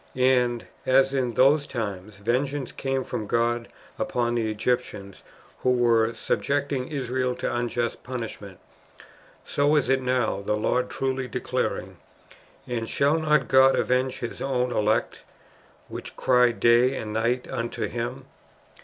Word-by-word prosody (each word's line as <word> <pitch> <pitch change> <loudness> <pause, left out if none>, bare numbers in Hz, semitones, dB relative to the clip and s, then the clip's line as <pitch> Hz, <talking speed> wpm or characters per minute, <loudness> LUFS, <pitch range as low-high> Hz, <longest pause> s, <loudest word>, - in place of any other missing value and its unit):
"^ - - -8
And 125 -2 +2 0.2
as, 135 +1 +3
in 125 -4 -1
those 140 +3 +4
times, 100 -4 -5
vengeance 130 +6 -1
came 135 -1 -2
from 105 - -5
God 120 +1 0 0.3
upon 120 -1 0
the 115 -2 0
Egyptians 105 -3 -2 0.4
who - - 0
were 115 -2 +3
subjecting 140 -2 -1
Israel 130 -3 -2
to - - -3
unjust 120 -1 -2
punishment, 115 -6 -7 0.9
so 145 +2 +2
is 150 - +2
it 135 0 +3
now, 125 -6 0
the 105 +1 -1
Lord 125 +4 0
truly 130 -1 -2
declaring, 115 - -3 0.3
*• - - -20 0.3
And 115 -2 -3
shall 145 +3 +2
not 150 -3 +2
God 130 0 +6
avenge 130 +1 0
His 120 - -5
own 125 -2 0
elect, 110 -1 0 0.7
which - - -8
cry 125 -1 +4
day 120 +3 +4
and 105 -3 -5
night 115 +3 0
unto 115 0 -3
Him 120 +3 -5
125 Hz, 140 wpm, -25 LUFS, 115-130 Hz, 0.9 s, God